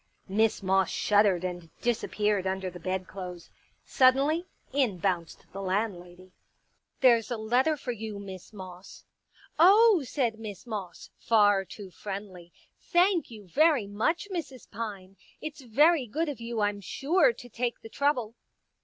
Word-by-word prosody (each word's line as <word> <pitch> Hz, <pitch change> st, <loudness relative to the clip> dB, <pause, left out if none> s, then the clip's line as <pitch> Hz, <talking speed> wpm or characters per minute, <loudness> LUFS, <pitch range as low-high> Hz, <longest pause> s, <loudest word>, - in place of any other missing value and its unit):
Miss 215 Hz, +1 st, +1 dB
Moss 190 Hz, -1 st, +2 dB
shuddered 205 Hz, -4 st, +2 dB
and 175 Hz, -2 st, -5 dB
disappeared 210 Hz, -4 st, 0 dB
under 190 Hz, -1 st, -2 dB
the 175 Hz, -, -10 dB
bedclothes. 185 Hz, -1 st, -5 dB, 0.3 s
Suddenly, 275 Hz, +7 st, +3 dB, 0.3 s
in 255 Hz, -9 st, +1 dB
bounced 175 Hz, -3 st, -2 dB
the 195 Hz, -, -5 dB
landlady. 185 Hz, -2 st, -3 dB
Pictures -, -, -46 dB
*• -, -, -39 dB
There's 235 Hz, -4 st, +5 dB
a 240 Hz, -, -2 dB
letter 250 Hz, +8 st, +1 dB
for 265 Hz, -3 st, -4 dB
you, 220 Hz, -2 st, -6 dB
Miss 190 Hz, -2 st, -9 dB
Moss.'* 185 Hz, -2 st, -11 dB, 0.3 s
" -, -, -27 dB, 0.2 s
Oh," 400 Hz, +2 st, +7 dB
said 240 Hz, -4 st, -1 dB
Miss 210 Hz, -2 st, -8 dB
Moss, 205 Hz, -6 st, -7 dB
far 205 Hz, -3 st, +4 dB
too 190 Hz, +1 st, -10 dB
friendly, 190 Hz, -3 st, -8 dB, 0.2 s
" -, -, -47 dB
thank 355 Hz, -2 st, +3 dB
you 215 Hz, -4 st, -12 dB
very 295 Hz, -, +3 dB
much, 230 Hz, -, -1 dB
Mrs. 280 Hz, -8 st, -6 dB
Pine. 200 Hz, -4 st, -6 dB, 0.2 s
It's 305 Hz, -1 st, -7 dB
very 280 Hz, +4 st, +3 dB
good 310 Hz, +8 st, -1 dB
of 275 Hz, -5 st, -6 dB
you, 230 Hz, -1 st, -3 dB
I'm 205 Hz, 0 st, 0 dB
sure, 345 Hz, -, +2 dB
to 245 Hz, -, -12 dB
take 240 Hz, +1 st, -3 dB
the -, -, -9 dB
trouble." 255 Hz, -5 st, 0 dB
215 Hz, 155 wpm, -28 LUFS, 190-265 Hz, 0.3 s, Oh